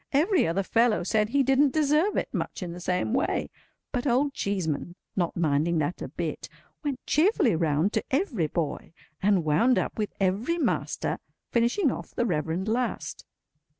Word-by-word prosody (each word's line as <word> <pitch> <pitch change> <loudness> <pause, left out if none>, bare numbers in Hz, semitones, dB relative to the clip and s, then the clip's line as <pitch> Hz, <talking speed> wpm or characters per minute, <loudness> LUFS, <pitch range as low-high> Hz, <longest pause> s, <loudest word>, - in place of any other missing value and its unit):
Every 335 - +3
other 180 +4 0
fellow 230 0 +2
said 210 +3 +1
he 275 +3 +3
didn't 270 +1 +3
deserve 310 +6 +2
it, - - -1
much - - -3
in 175 - -5
the 175 - -8
same 180 +5 -1
way; 265 +5 0 0.4
but 250 +1 -1
Old 275 +3 +2
Cheeseman, 175 - -2 0.2
not 175 -3 -1
minding 160 +1 +2
that 155 +3 -1
a - - -3
bit, - - -5 0.3
went 280 -4 -3
cheerfully 320 - +3
round 160 +4 +1
to - - 0
every 265 - 0
boy, 160 0 -3 0.3
and 190 -4 +3
wound 200 +12 +3
up - - -2
with 210 - -1
every 200 - +1
master—finishing 250 - -1
off - - -7
the 240 - +1
Reverend 170 0 -1
last. 240 +3 -2
215 Hz, 160 wpm, -27 LUFS, 175-275 Hz, 0.4 s, Every